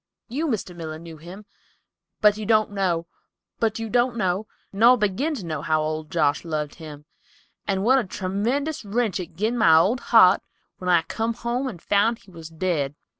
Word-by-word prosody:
You, 295 +7 -2
Mr. 210 - -3
Miller, 160 -2 -6
knew 165 0 -11
him, 180 +6 -11 0.8
but 210 -1 +5
you 215 - -6
don't 215 -2 +3
know—no, 210 +3 -2 0.3
nor 235 +5 +6
begin 230 +9 0
to 205 -10 -7
know, 155 -3 -4
how 155 0 +1
old 155 0 -4
Josh 150 -4 +1
loved 155 -3 -3
him, 150 -2 -10 0.6
and 195 -1 0
what 260 +4 +5
a - - -1
tremendous 220 +12 -2
wrench 215 -1 -1
it 170 -3 -7
gin 215 +7 -1
my 165 -7 +6
old 200 +10 +3
heart 200 -7 +5 0.4
when 180 - -3
I 170 -2 +4
come 225 +1 -3
home 240 +3 -2
and 205 -9 -6
found 205 +6 +2
he 195 - -20
was 165 -2 -10
dead. 160 -4 -2
195 Hz, 170 wpm, -24 LUFS, 165-230 Hz, 0.8 s, nor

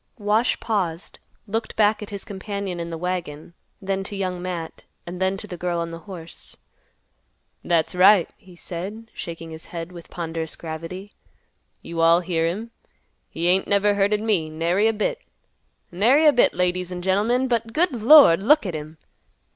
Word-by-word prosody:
Wash 215 +3 +1
paused, 185 -6 -3 0.3
looked 220 +2 -3
back 215 0 +3
at 210 - -7
his 200 -1 -7
companion 200 -2 -5
in 170 0 -4
the 165 - -5
wagon; 170 -3 -4 0.3
then 195 -1 -2
to 205 - -7
Young 185 -2 -3
Matt, 175 -3 -6 0.2
and 180 +1 -7
then 190 +1 +1
to 205 - -8
the 180 -4 -8
girl 175 0 -2
on 170 0 -3
the 165 - -7
horse. 170 -3 -10 1.1
"That's 170 -2 +1
right," 185 0 +6
he 185 -2 -18
said, 195 +6 -7
shaking 165 -1 -7
his 160 0 -9
head 170 0 -7
with 170 -2 -12
ponderous 165 -2 -5
gravity. 165 +5 -7 0.7
"You 165 0 -4
all 165 +1 +5
hear 165 -2 0
him. 215 +7 -4 0.6
He 170 +2 -2
ain't 185 +2 +2
never 205 +1 +3
hurted 205 +1 +1
me, 190 -8 +1
nary 170 +7 +1
a 225 - +2
bit. 335 - -2 0.7
Nary 240 - +4
a 300 - +7
bit, 245 - +3
ladies 180 0 -1
an' 180 0 -5
gentlemen. 220 +7 +1
But, 230 -2 -1
good 340 +8 +2
Lord! 235 - +8
look 295 +5 +4
at 180 - -3
him! 155 +1 -7
185 Hz, 170 wpm, -23 LUFS, 170-210 Hz, 1.1 s, Lord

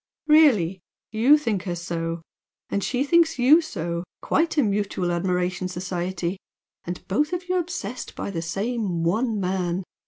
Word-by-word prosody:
"Really! 240 - +4 0.3
YOU 240 +7 +5
think 215 -10 -2
her 175 -2 -2
so! 165 -1 -4 0.5
And 200 - 0
SHE 255 +1 0
thinks 330 +1 +3
you 275 +7 +6
so! 170 - -4 0.2
Quite 325 +1 +1
a 290 - +5
mutual 200 -4 -1
admiration 180 +1 -1
society! 180 0 -3 0.4
And 175 +1 -7
both 295 - 0
of 355 0 -3
you 365 0 +1
obsessed 255 - -5
by - - -4
the 165 -4 -3
same 195 0 -2
one 215 +6 +1
man! 180 -1 -1
195 Hz, 150 wpm, -24 LUFS, 175-260 Hz, 0.5 s, you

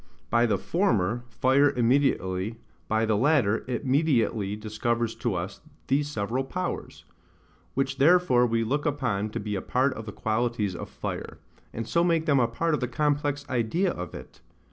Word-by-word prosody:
By 120 0 +4
the 105 -3 +1
former, 120 - 0
fire 130 +4 +3
immediately, 115 -6 +1 0.3
by 110 +1 +1
the 110 -1 +2
latter, 120 -3 +2
it 125 +2 -3
mediately 120 -8 +1
discovers 115 +2 -1
to 120 -7 -1
us 90 +3 -5 0.3
these 145 +2 +2
several 120 0 -2
powers; 180 +6 -5 0.7
which 135 +1 -1
therefore 140 -5 +5
we 115 0 +1
look 145 +7 -1
upon 115 -8 -1
to - - -4
be 105 0 -4
a 95 - -2
part 130 +2 +1
of 110 0 -8
the - - -4
qualities 110 -3 -1
of - - -7
fire, - - -6 0.3
and 115 0 -5
so 170 +6 +2
make 165 -2 +2
them 140 -4 +3
a 120 - +3
part 165 +8 -1
of 150 - +1
the 125 - -1
complex 145 +2 -1
idea 130 - 0
of 90 -2 -6
it. - - -11
120 Hz, 170 wpm, -27 LUFS, 110-145 Hz, 0.7 s, therefore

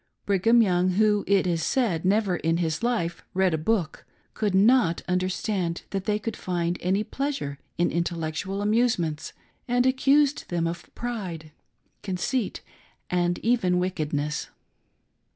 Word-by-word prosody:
Brigham 225 +4 +4
Young, 180 -2 +2
who 210 +1 +3
it 195 -2 +3
is 170 -2 0
said, 190 -10 0
never 195 -2 +2
in 165 +1 0
his 160 0 -1
life 220 -9 -1
read 190 -2 +3
a - - +1
book, 170 -1 -1 0.3
could 205 -3 0
not 210 -3 +4
understand 185 -1 -1
that 195 0 -3
they 210 -1 +1
could 215 +1 -4
find 175 -1 -2
any 190 +4 +1
pleasure 270 - -3 0.2
in 175 - +2
intellectual 170 +3 -2
amusements, 205 -9 +1 0.4
and 245 0 +2
ac 260 - +4
cused 285 +1 +3
them 170 -1 0
of 170 +1 -5
pride, 185 -10 -5 0.5
conceit, 200 +5 -2 0.5
and 175 -1 +1
even 225 -7 +2
wickedness. 150 -5 -2
185 Hz, 135 wpm, -26 LUFS, 170-220 Hz, 0.5 s, Brigham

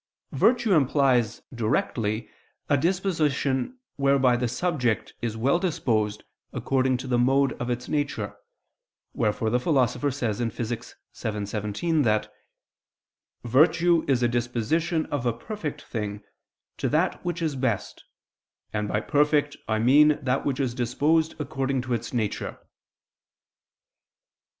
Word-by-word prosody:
Virtue 230 -3 +3
implies 135 - +2
directly 110 -1 -1 0.4
a 145 - +5
disposition 160 - 0 0.2
whereby 135 -3 +3
the 120 0 0
subject 125 -3 -1
is 115 -2 -3
well 140 +9 +2
disposed 110 - 0 0.3
according 130 -1 +1
to 125 - -7
the 125 -2 +1
mode 135 +2 +3
of 120 - -2
its 125 0 -3
nature: 145 -9 -2 0.8
wherefore 110 +1 0
the 125 - +2
Philosopher 135 -1 +1
says 120 -6 -2
(Phys. 115 -1 0 0.2
vii, 120 - -1
text. 115 - -14 0.2
17) 105 +8 -2
that 110 -5 +1 1.1
"virtue 160 +7 +4
is 130 -3 +2
a - - +5
disposition 120 +8 0
of 130 -4 -1
a 120 - +2
perfect 150 - -6
thing 105 -2 -5 0.5
to - - -1
that - - 0
which 175 -1 -2
is 160 -4 -1
best; 130 -6 -2 0.7
and 105 -1 -1
by 105 - 0
perfect 145 +1 +2
I 110 0 +1
mean 145 +6 +5
that 130 +1 0
which 135 -1 -1
is 130 -4 0
disposed 145 +7 +1
according 135 -3 -1
to 125 -1 -2
its 115 0 -3
nature." 110 -5 -2
130 Hz, 130 wpm, -26 LUFS, 115-150 Hz, 1.1 s, a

